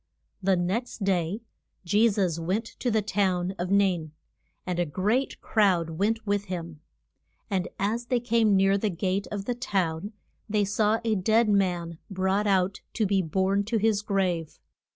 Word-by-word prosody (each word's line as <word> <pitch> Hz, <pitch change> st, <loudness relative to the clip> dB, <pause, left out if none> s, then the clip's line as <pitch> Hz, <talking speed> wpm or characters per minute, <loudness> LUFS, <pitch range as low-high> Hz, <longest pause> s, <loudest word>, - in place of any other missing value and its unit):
The 190 Hz, 0 st, +3 dB
next 195 Hz, +6 st, -2 dB
day 190 Hz, +2 st, 0 dB, 0.4 s
Je 210 Hz, +6 st, +4 dB
sus 185 Hz, -6 st, 0 dB
went 190 Hz, +7 st, -1 dB
to 250 Hz, -, 0 dB
the 220 Hz, -2 st, +1 dB
town 185 Hz, -2 st, 0 dB
of 180 Hz, +1 st, -2 dB
Nain. 185 Hz, -6 st, +2 dB, 0.5 s
And 180 Hz, -1 st, -2 dB
a 175 Hz, -, +2 dB
great 210 Hz, -, 0 dB
crowd 185 Hz, -7 st, +2 dB
went 215 Hz, +7 st, -1 dB
with 205 Hz, -1 st, 0 dB
him. 170 Hz, -5 st, -6 dB, 0.7 s
And 185 Hz, -2 st, 0 dB
as 225 Hz, +5 st, -1 dB
they 250 Hz, -1 st, +1 dB
came 230 Hz, -3 st, +2 dB
near 195 Hz, +1 st, +3 dB
the 215 Hz, -, 0 dB
gate 190 Hz, +2 st, -1 dB
of 200 Hz, -2 st, -4 dB
the 245 Hz, -, 0 dB
town 195 Hz, -5 st, -2 dB, 0.4 s
they 210 Hz, -1 st, +2 dB
saw 210 Hz, +2 st, +1 dB
a 225 Hz, -1 st, +1 dB
dead 215 Hz, +3 st, +3 dB
man 175 Hz, -5 st, 0 dB
brought 190 Hz, +2 st, 0 dB
out 190 Hz, -1 st, +1 dB
to 220 Hz, -, +1 dB
be 195 Hz, -1 st, +2 dB
borne 190 Hz, +4 st, +1 dB
to 225 Hz, +2 st, 0 dB
his 215 Hz, -1 st, +2 dB
grave. 185 Hz, -6 st, -1 dB
195 Hz, 165 wpm, -27 LUFS, 180-215 Hz, 0.7 s, Je